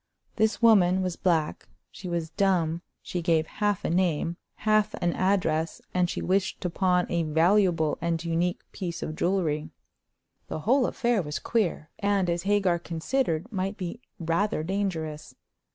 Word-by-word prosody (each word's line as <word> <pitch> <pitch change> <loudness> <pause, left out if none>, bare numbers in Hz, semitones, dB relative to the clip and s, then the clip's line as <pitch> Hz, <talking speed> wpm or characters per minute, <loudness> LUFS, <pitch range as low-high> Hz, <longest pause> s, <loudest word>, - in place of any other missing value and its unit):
This 220 +1 +1
woman 190 -5 +5
was 180 -2 -2
black, 165 -4 0 0.2
she 190 -2 -8
was 170 -2 -2
dumb, 175 -5 +1 0.2
she 175 - -3
gave 160 -1 +2
half 205 +2 -1
a - - 0
name, 170 -2 +1 0.2
half 215 -1 +2
an 175 -1 0
address, 170 -4 +1
and 180 -1 +2
she - - -3
wished 190 +1 0
to 180 - -2
pawn 180 0 +2
a 170 -1 0
valuable 165 0 +2
and 170 0 -1
unique 170 +1 0
piece 175 -2 -5
of 155 - -4
jewelry. 160 -4 0 0.8
The 155 - -4
whole 250 - +3
affair 235 -4 +1
was 150 -3 -4
queer, 195 -9 -1
and, 200 -3 +1
as 170 0 -1
Hagar 195 -4 +3
considered, 170 +3 -1
might 195 0 -2
be 185 +5 -5 0.2
rather 170 +1 0
dangerous. 165 -5 -3
180 Hz, 150 wpm, -27 LUFS, 165-200 Hz, 0.8 s, woman